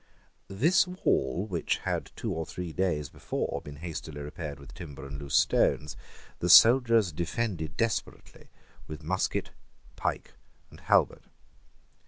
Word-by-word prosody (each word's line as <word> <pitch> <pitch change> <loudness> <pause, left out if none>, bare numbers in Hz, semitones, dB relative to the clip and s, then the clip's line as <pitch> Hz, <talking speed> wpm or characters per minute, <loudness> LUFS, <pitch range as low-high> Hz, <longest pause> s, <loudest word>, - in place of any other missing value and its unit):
This 160 - +3
wall, 90 - 0
which 90 -6 -1
had - - -3
two - - -3
or 80 - -2
three 85 0 -6
days 75 -4 0
before - - -4
been 75 - -9
hastily 80 -1 -7
repaired 75 0 -6
with 70 -1 -13
timber 75 -6 -9
and 70 0 -7
loose 70 -1 -3
stones, 75 0 +2 0.4
the 90 - -1
soldiers 115 -1 +7
defended 85 -2 -3
desperately 115 -2 -3 0.4
with 75 +1 -8
musket, 95 +4 -1 0.4
pike, - - -3 0.4
and - - -14
halbert. - - +2
85 Hz, 130 wpm, -29 LUFS, 75-100 Hz, 0.4 s, soldiers